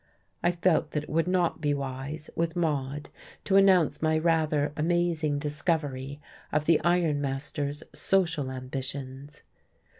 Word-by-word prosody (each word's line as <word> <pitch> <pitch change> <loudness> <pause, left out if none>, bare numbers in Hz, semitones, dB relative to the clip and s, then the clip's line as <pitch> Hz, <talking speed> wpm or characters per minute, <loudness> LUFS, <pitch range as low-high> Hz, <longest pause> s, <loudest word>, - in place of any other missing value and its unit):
I 175 - +3
felt 175 -1 +1
that 150 - -1
it - - -10
would 165 +2 +1
not 180 -3 +1
be 145 -2 +1
wise, 140 +3 -5
with 165 0 -1
Maude, 145 -4 -1 0.3
to 195 - +1
announce 190 -5 +5
my 155 0 +2
rather 155 -3 +1
amazing 160 -2 +1
discovery 145 -2 -2 0.3
of 150 0 +1
the 165 -1 +5
iron 170 -4 +2
master's 140 +1 -3
social 165 -8 +1
ambitions. 130 +2 -6
150 Hz, 130 wpm, -28 LUFS, 140-170 Hz, 0.3 s, announce